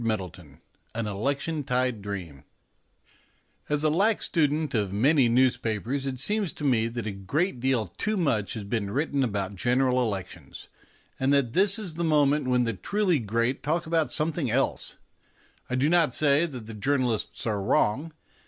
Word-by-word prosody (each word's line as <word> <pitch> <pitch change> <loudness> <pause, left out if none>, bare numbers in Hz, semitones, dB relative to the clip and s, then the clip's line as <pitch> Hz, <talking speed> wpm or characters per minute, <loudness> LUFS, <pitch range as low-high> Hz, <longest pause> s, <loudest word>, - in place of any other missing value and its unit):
XVI 90 -9 -4 0.4
AN 115 -1 -2
ELECTION 140 +9 -2
TIDE 125 -3 0
DREAM 90 -9 -6 1.3
As 150 0 0
a 155 - +3
lax 205 +7 +2
student 155 -1 0
of 105 -4 0
many 130 +5 +3
newspapers 125 +1 +1
it 130 -1 -3
seems 205 - 0
to - - -9
me 120 -5 +2
that 115 -1 -5
a 110 - -2
great 125 - -2
deal 130 -3 +1
too 215 - -3
much 130 - 0
has 110 - -5
been 100 -1 -2
written 140 +4 0
about 100 -4 -2
General 125 +4 +2
Elections, 95 - -5 0.5
and 130 +1 +2
that 140 -5 +2
this 195 +2 +4
is 200 -7 -3
the 170 +2 -3
moment 150 -3 +3
when 125 -1 +3
the 115 -1 -1
truly 180 - 0
great 115 +3 -1
talk 160 +5 -1
about 160 -1 +1
something 155 -3 -1
else. 130 +4 -1 0.7
I 125 - -1
do 130 +3 +2
not 165 -5 +3
say 150 +2 +3
that 125 -8 -8
the 115 - -8
journalists 125 0 -1
are 105 -3 -1
wrong. 130 +10 +1
130 Hz, 165 wpm, -26 LUFS, 110-150 Hz, 1.3 s, this